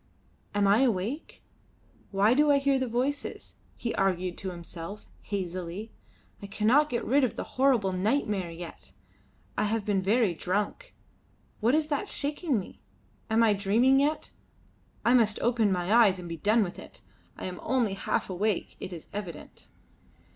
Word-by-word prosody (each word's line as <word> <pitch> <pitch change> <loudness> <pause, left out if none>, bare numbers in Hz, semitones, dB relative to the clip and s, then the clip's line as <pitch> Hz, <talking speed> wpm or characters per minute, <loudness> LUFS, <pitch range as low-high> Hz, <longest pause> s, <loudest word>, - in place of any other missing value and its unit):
"Am 205 0 +3
I 200 +3 +5
awake? 240 - -1 0.7
Why 200 +3 +3
do 295 +3 +4
I 285 - +6
hear 275 -1 +2
the 260 - -1
voices?" 255 +5 -3 0.2
he 235 - -3
argued 185 -2 0
to 190 - -4
himself, 170 +3 -8 0.2
hazily. 185 +1 -5 0.5
"I 200 - -7
cannot 230 +9 +3
get 235 - -2
rid 280 +3 +3
of 255 - 0
the - - -3
horrible 255 -7 +2
nightmare 200 -1 0
yet. 170 +1 -10 0.6
I - - +1
have 215 0 -1
been 200 -2 +1
very 205 0 +2
drunk. 205 - -3 0.6
What 235 +5 +3
is 310 0 0
that 290 - -1
shaking 290 - 0
me? 185 - -10 0.5
I 220 - 0
am 210 -2 +3
dreaming 230 +7 +4
yet 295 +3 0 0.7
I 240 - +5
must 220 -4 +3
open 230 -3 +2
my 180 +2 0
eyes 220 -5 +6
and 180 -1 -8
be 165 0 -5
done 215 +7 +3
with 180 - -6
it. - - -13 0.4
I - - -6
am 180 -1 -5
only 240 -5 +1
half 195 - -1
awake, 195 +1 -1
it - - -6
is 170 -3 -8
evident." 185 -7 -8
210 Hz, 160 wpm, -28 LUFS, 185-255 Hz, 0.7 s, I